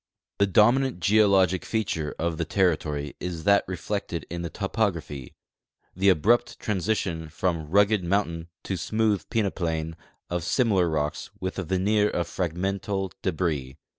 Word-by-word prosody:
The 100 Hz, -, +4 dB
dominant 120 Hz, +5 st, +4 dB
geologic 95 Hz, -2 st, +4 dB
feature 90 Hz, -9 st, -2 dB
of 85 Hz, -1 st, -1 dB
the -, -, +1 dB
territory 75 Hz, -5 st, 0 dB
is 85 Hz, -3 st, -4 dB
that 100 Hz, +3 st, +5 dB
reflected 90 Hz, -2 st, -3 dB
in 85 Hz, 0 st, -3 dB
the 85 Hz, -, -4 dB
topography 85 Hz, -, -2 dB, 0.3 s
— -, -, -45 dB
the 100 Hz, +2 st, +3 dB
abrupt 110 Hz, +8 st, +3 dB
transition 95 Hz, -5 st, -1 dB
from 85 Hz, -2 st, -2 dB
rugged 100 Hz, +2 st, +4 dB
mountain 85 Hz, -3 st, -1 dB, 0.2 s
to 95 Hz, -, -3 dB
smooth 110 Hz, +3 st, 0 dB
peneplain 85 Hz, -7 st, -1 dB, 0.3 s
of 90 Hz, -1 st, -2 dB
similar 95 Hz, -3 st, +2 dB
rocks 75 Hz, -1 st, -2 dB
with 95 Hz, +1 st, -3 dB
a -, -, -1 dB
veneer 100 Hz, +4 st, +2 dB
of 85 Hz, -1 st, -2 dB
fragmental 95 Hz, +2 st, -2 dB
debris. 75 Hz, -8 st, -2 dB
90 Hz, 135 wpm, -26 LUFS, 80-100 Hz, 0.3 s, that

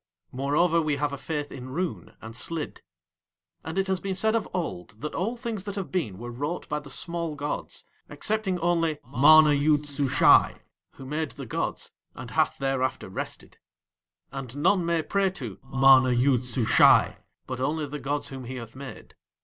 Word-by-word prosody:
Moreover, 150 Hz, +6 st, +2 dB
we 155 Hz, -2 st, 0 dB
have 145 Hz, 0 st, -1 dB
a -, -, -4 dB
faith 150 Hz, -1 st, -4 dB
in 130 Hz, 0 st, -8 dB
Roon 175 Hz, +6 st, -4 dB
and 110 Hz, +1 st, -9 dB
Slid. 155 Hz, +6 st, -4 dB, 0.8 s
And 160 Hz, +3 st, -6 dB
it 195 Hz, -, +2 dB
has 190 Hz, -1 st, -1 dB
been 195 Hz, 0 st, -3 dB
said 220 Hz, +3 st, +2 dB
of 230 Hz, -2 st, -1 dB
old 105 Hz, -, -5 dB
that 150 Hz, -, -4 dB
all 225 Hz, +8 st, -2 dB
things 230 Hz, -4 st, -4 dB
that 200 Hz, -1 st, -5 dB
have 195 Hz, -3 st, -5 dB
been 140 Hz, -, -2 dB
were 120 Hz, +3 st, -7 dB
wrought 145 Hz, +8 st, -4 dB
by 150 Hz, -, -2 dB
the 145 Hz, -1 st, -12 dB
small 170 Hz, 0 st, -2 dB
gods, 145 Hz, 0 st, -5 dB, 0.2 s
excepting 215 Hz, -4 st, -1 dB
only 165 Hz, -2 st, +1 dB
MANA 150 Hz, +4 st, +6 dB
YOOD 145 Hz, +1 st, +2 dB
SUSHAI, 140 Hz, -2 st, +4 dB, 0.3 s
who 135 Hz, -, -11 dB
made 150 Hz, +2 st, -3 dB
the 140 Hz, -, -8 dB
gods 110 Hz, -, -3 dB, 0.2 s
and -, -, -9 dB
hath -, -, +1 dB
thereafter 135 Hz, -6 st, -1 dB
rested. 95 Hz, -, -7 dB, 0.7 s
And 135 Hz, -1 st, -7 dB
none 175 Hz, +3 st, +2 dB
may 170 Hz, -1 st, +1 dB
pray 195 Hz, +2 st, +1 dB
to 120 Hz, -, -7 dB
MANA 135 Hz, -1 st, +5 dB
YOOD 125 Hz, 0 st, +2 dB
SUSHAI 120 Hz, -2 st, +4 dB, 0.3 s
but 130 Hz, -1 st, -5 dB
only 150 Hz, +4 st, -1 dB
the 145 Hz, +1 st, -6 dB
gods 140 Hz, +2 st, -2 dB
whom 130 Hz, -2 st, -8 dB
he 130 Hz, +2 st, -6 dB
hath 115 Hz, -2 st, -8 dB
made. 135 Hz, 0 st, -10 dB
145 Hz, 175 wpm, -26 LUFS, 130-170 Hz, 0.8 s, MANA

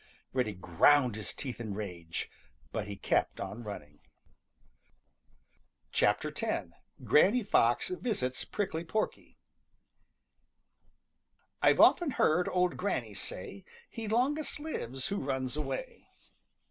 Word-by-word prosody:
Reddy 125 Hz, -5 st, 0 dB
ground 120 Hz, -, +4 dB
his 105 Hz, -4 st, -5 dB
teeth 130 Hz, -4 st, -6 dB
in 105 Hz, -4 st, -4 dB
rage, 85 Hz, -6 st, -5 dB, 0.4 s
but 105 Hz, -2 st, -3 dB
he 100 Hz, -, -5 dB
kept 95 Hz, -, 0 dB
on 120 Hz, -, -5 dB
running. 75 Hz, -9 st, -8 dB, 1.9 s
X. -, -, +3 dB, 0.8 s
GRANNY 210 Hz, +10 st, +5 dB
FOX 120 Hz, -, +3 dB
VISITS 210 Hz, -, -2 dB
PRICKLY 190 Hz, -6 st, -2 dB
PORKY 215 Hz, +6 st, -3 dB, 2.2 s
"I've -, -, +5 dB
often 345 Hz, -4 st, +6 dB
heard 180 Hz, -, +2 dB
old 180 Hz, -1 st, +1 dB
Granny 200 Hz, +2 st, -2 dB
say: -, -, -6 dB
' 470 Hz, +1 st, -24 dB
He 225 Hz, -2 st, -5 dB
longest 275 Hz, +8 st, 0 dB
lives 135 Hz, -, -4 dB
who 200 Hz, -, -1 dB
runs 130 Hz, -3 st, -2 dB
away.'" 135 Hz, -3 st, -5 dB
135 Hz, 110 wpm, -31 LUFS, -, 2.2 s, often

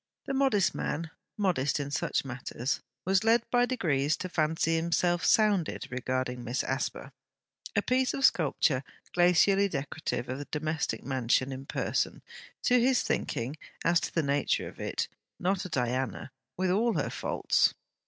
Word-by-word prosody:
The 275 Hz, -, -3 dB
modest 265 Hz, -8 st, +3 dB
man 160 Hz, +2 st, -3 dB, 0.3 s
(modest 170 Hz, -10 st, +1 dB
in 140 Hz, 0 st, -4 dB
such 140 Hz, -, 0 dB
matters) 130 Hz, 0 st, -3 dB, 0.2 s
was 190 Hz, +2 st, +3 dB
led 230 Hz, +1 st, +4 dB
by 245 Hz, 0 st, +4 dB
degrees 155 Hz, -, +1 dB
to 185 Hz, -, -5 dB
fancy 160 Hz, 0 st, +1 dB
himself 170 Hz, +1 st, +1 dB
sounded 205 Hz, -6 st, +3 dB
regarding 130 Hz, 0 st, -2 dB
Miss 120 Hz, +3 st, -1 dB
Asper: 135 Hz, +1 st, -3 dB, 0.6 s
a 205 Hz, -, +2 dB
piece 255 Hz, 0 st, +1 dB
of 275 Hz, -, +2 dB
sculpture 145 Hz, -4 st, +2 dB, 0.3 s
glacially 185 Hz, +3 st, +4 dB
decorative 140 Hz, -5 st, -3 dB
of 130 Hz, +2 st, -4 dB
the 145 Hz, -, -5 dB
domestic 155 Hz, -6 st, -2 dB
mansion 130 Hz, 0 st, +1 dB
in 135 Hz, +1 st, -7 dB
person, -, -, -1 dB, 0.4 s
to 250 Hz, 0 st, +4 dB
his 255 Hz, +1 st, +3 dB
thinking; 130 Hz, +7 st, -2 dB, 0.3 s
and 165 Hz, -, +5 dB
as 170 Hz, -, +4 dB
to -, -, -4 dB
the 165 Hz, -, +2 dB
nature 140 Hz, 0 st, +1 dB
of -, -, -12 dB
it -, -, -2 dB, 0.3 s
not 190 Hz, +2 st, 0 dB
a -, -, -5 dB
Diana, 130 Hz, -, -2 dB, 0.3 s
with 185 Hz, 0 st, +1 dB
all 225 Hz, +5 st, +2 dB
her -, -, -1 dB
faults! -, -, +1 dB
160 Hz, 155 wpm, -29 LUFS, 135-195 Hz, 0.6 s, and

